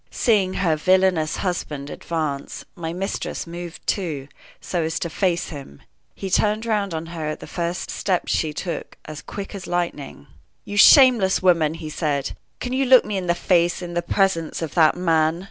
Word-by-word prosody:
Seeing 200 -6 +1
her 170 -4 +1
villainous 185 -1 +2
husband 150 -6 -3
advance, 155 -4 -4
my 165 -2 -4
mistress 190 +3 -4
moved, 170 0 -8
too, 150 -8 -2 0.3
so 175 - -2
as 160 0 -2
to 170 - -3
face 175 0 0
him. 140 - -10 0.3
He 195 -1 -6
turned 215 +3 +2
round 205 -6 -1
on 160 +1 -4
her 160 -2 -4
at 155 - -4
the - - -9
first 170 0 -3
step 185 -3 0
she 155 - 0
took, 170 +3 -5
as 155 -1 -8
quick 200 0 -7
as 195 -2 -7
lightning. 160 - -3 0.4
"You 205 - -6
shameless 230 - +6
woman!" 165 -4 +3
he 155 -2 -7
said. 145 -4 -1 0.3
"Can 250 - -4
you 270 +1 +1
look 255 -1 +6
me 210 - -3
in 185 -2 -3
the 175 - +2
face 175 0 +1
in 175 -1 -6
the 175 - 0
presence 170 -3 0
of 155 - -5
that 160 0 +4
man?" 165 -2 +2
175 Hz, 180 wpm, -22 LUFS, 160-190 Hz, 0.4 s, shameless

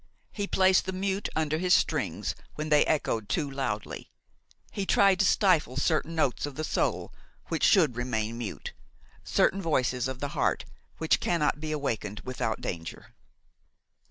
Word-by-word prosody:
He 205 -1 -3
placed 190 -1 +3
the 190 - -2
mute 195 +1 -2
under 155 0 0
his 180 0 +4
strings - - -1 0.2
when 155 0 -4
they 150 -1 +5
echoed 115 -8 0
too 155 -4 0
loudly; 135 -7 -4 0.6
he 200 - -3
tried 195 -1 +4
to 200 - +4
stifle 170 - +3
certain 160 +2 0
notes 145 -3 0
of 145 - -8
the 155 - -3
soul - - -1 0.4
which - - -2
should 160 - +5
remain 115 -2 -2
mute, 115 -4 -6 0.5
certain 195 - +2
voices 130 -6 0
of 130 -1 -5
the 145 - -3
heart - - 0 0.3
which 160 - +2
cannot 150 -4 0
be 155 0 -4
awakened 115 -8 -3
without 130 -3 -3
danger. 85 -1 -6
150 Hz, 155 wpm, -28 LUFS, 125-180 Hz, 0.6 s, they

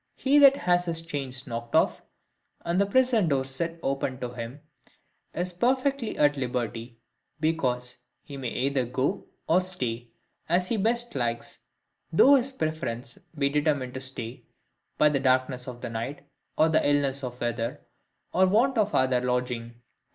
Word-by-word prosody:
He 280 +2 +3
that 275 -1 +8
has 175 -5 +1
his 165 -1 -3
chains 135 -4 -4
knocked 115 -1 -5
off, - - +3 0.6
and 175 +3 +2
the 200 - +2
prison 240 -3 +3
doors 135 -2 0
set 165 +5 -3
open 135 -1 -1
to 125 - -3
him, 120 +4 -7 0.7
is 180 +1 -2
perfectly 260 +5 0
at 145 -1 +4
liberty, 120 -3 -3 0.4
because 125 -6 0 0.3
he 140 - -9
may 130 -3 -3
either 135 +1 0
go 130 +3 -1 0.2
or 180 +3 +4
stay, 125 -11 -4 0.4
as 180 +2 +2
he 230 - +1
best 235 +3 0
likes, 120 -3 -3 0.5
though 260 - +7
his 270 -1 +3
preference 155 - -3 0.2
be 140 -1 +2
determined 145 -3 0
to 130 - -5
stay, 125 -2 -7 0.5
by 150 - +5
the 145 -2 +2
darkness 130 -1 +1
of 120 -1 -8
the - - -4
night, 115 +6 -5 0.3
or 160 0 +3
illness 140 -2 +2
of 125 -1 -5
the 120 - -3
weather, 120 0 -3 0.5
or 185 +1 +4
want 235 +6 +3
of 210 -1 +1
other 130 -1 +3
lodging. 125 -1 -2
140 Hz, 160 wpm, -27 LUFS, 125-175 Hz, 0.7 s, that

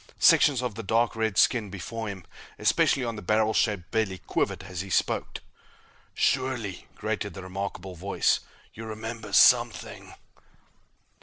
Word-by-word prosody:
Sections 135 -4 +5
of 125 -3 -2
the 115 - -6
dark 115 +3 +1
red 110 -3 -1
skin 110 0 +3
before 110 +4 -6
him, 95 -4 -7 0.3
especially 130 -2 +2
on 115 -2 -4
the - - -6
barrel 110 +3 +2
shaped 100 -6 0
belly, 110 -4 0
quivered 90 - -2
as 90 -2 -5
he 95 - -8
spoke. - - -1 0.7
"Surely," 130 -8 -1
grated - - -3
the 95 - -8
remarkable 95 0 -5
voice, 95 +3 +1 0.3
"you 115 - -8
remember 110 0 -6
something?" 120 +3 +3
110 Hz, 140 wpm, -27 LUFS, 95-115 Hz, 0.7 s, Sections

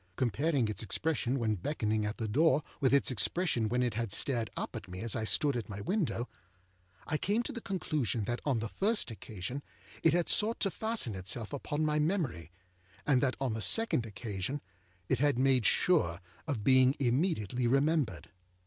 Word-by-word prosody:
Comparing 130 - +1
its 105 - -3
expression 135 +1 -1
when 115 -4 0
beckoning 110 - -1
at 105 - -5
the 115 - -3
door 145 +5 +3 0.2
with 130 - +2
its 140 -1 +3
expression 120 - +1
when 125 +2 +1
it 120 -3 -1
had 115 -1 -3
stared 115 0 +1
up - - -4
at - - -7
me 90 0 -8
as 115 -1 -1
I 110 -2 -2
stood 140 +4 +2
at 120 -3 -4
my 100 0 -6
window, 150 - -1 0.8
I 155 - -2
came 215 +4 0
to 285 - -4
the 235 -4 -6
conclusion 155 - -2
that 120 +4 -3
on 140 -5 +1
the 115 +1 -2
first 205 - 0
occasion 110 +4 -6 0.4
it 165 - +4
had 175 -1 +1
sought 220 +2 +5
to 195 - +2
fasten 220 - -2
itself 95 +6 -4
upon 145 +2 -2
my 150 0 +1
memory, 150 - -1 0.5
and 135 -4 +3
that 130 -2 +1
on 135 -4 -1
the 110 - -4
second 225 - +3
occasion 105 +4 -4 0.5
it 130 - +1
had 145 -2 +2
made 130 -3 +3
sure 90 - +2 0.3
of 130 -9 -2
being 130 +2 +5
immediately 125 - 0
remembered. 135 - 0
130 Hz, 185 wpm, -31 LUFS, 110-155 Hz, 0.8 s, sought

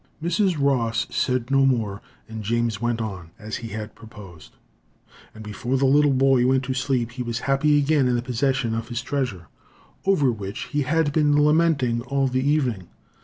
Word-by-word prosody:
Mrs. 175 +1 0
Ross 125 -5 +1
said 125 -1 -1
no 135 0 +4
more, 115 -6 0 0.3
and 110 -1 -7
James 115 0 -1
went 120 -1 -1
on, 95 -7 -5
as 110 0 -6
he 115 - -7
had 105 0 -6
proposed; 105 -8 -14 0.8
and 110 - -10
before 120 +5 -3
the 135 - +1
little 145 +2 +4
boy 135 -1 +3
went 130 0 +2
to 130 0 -2
sleep, 130 -3 -1
he 125 +1 -7
was 120 -1 -3
happy 145 +3 +2
again 145 -2 +2
in 125 - +1
the 120 - -1
possession 125 -1 -1
of 115 0 -3
his 120 0 -4
treasure, 125 -12 -3 0.6
over 150 -10 +2
which 100 -3 -6
he 145 - 0
had 145 +1 0
been 150 -1 +3
lamenting 150 -6 +2
all 135 +2 -1
the 130 0 -1
evening. 130 - 0
125 Hz, 180 wpm, -23 LUFS, 115-140 Hz, 0.8 s, no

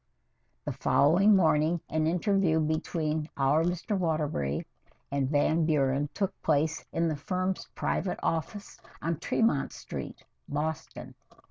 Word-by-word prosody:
The - - -2
following 195 +9 +4
morning 165 -2 +3
an 155 0 0
interview 180 -1 +2
between 155 0 -1
"our 140 +3 +3
Mr. 180 +4 -1
Waterbury" 150 - -1 0.5
and 140 -2 0
Van 155 +3 +2
Buren 145 -2 +1
took 195 -2 -1
place 155 +3 +1
in 165 0 +1
the 155 - 0
firm's 185 +4 -2
private 180 - -1
office 175 +5 -3 0.2
on 165 -1 -2
Tremont 225 -12 +1
Street, - - -7 0.3
Boston. 150 +2 -4
160 Hz, 120 wpm, -29 LUFS, 150-175 Hz, 0.5 s, following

